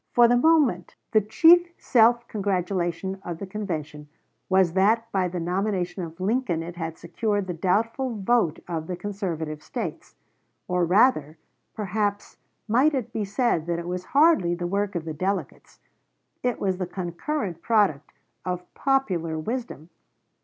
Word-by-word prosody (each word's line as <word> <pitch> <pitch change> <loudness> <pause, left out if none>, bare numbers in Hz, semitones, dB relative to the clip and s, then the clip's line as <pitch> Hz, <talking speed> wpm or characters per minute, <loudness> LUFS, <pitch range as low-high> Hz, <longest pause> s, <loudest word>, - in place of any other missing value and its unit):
For 240 -1 +7
the 245 - +4
moment 265 - +3 0.2
the 215 - +5
chief 330 - +5
self 235 0 +3
congratulation 190 -2 -2
of 170 -2 -5
the 200 - -6
convention 160 -7 -5 0.4
was 190 -3 +3
that 220 +5 +2
by 190 -2 +1
the 180 0 -4
nomination 185 +1 -1
of 165 0 -7
Lincoln 190 -4 0
it 175 +1 -8
had 165 -2 -5
secured 205 +4 -2
the 180 - -4
doubtful 225 +8 0
vote 200 -5 +1
of 165 -2 -4
the 180 - -3
conservative 175 -6 -4
States. - - -6 0.5
Or 180 -1 +1
rather, 170 - +3 0.4
perhaps, 205 0 -2 0.3
might 265 +7 +3
it 255 -5 -3
be 215 - -1
said 200 - 0
that 170 -1 0
it 170 0 -5
was 180 +1 -4
hardly 280 - +4
the 175 0 -4
work 200 +2 -1
of 165 -2 -3
the 160 - -4
delegates 190 +6 -4 0.6
it 245 -1 -1
was 190 -2 0
the 185 - -2
concurrent 180 - -4
product 200 -11 +1 0.3
of 180 -1 -5
popular 185 - 0
wisdom. 175 - -5
190 Hz, 150 wpm, -25 LUFS, 175-225 Hz, 0.6 s, For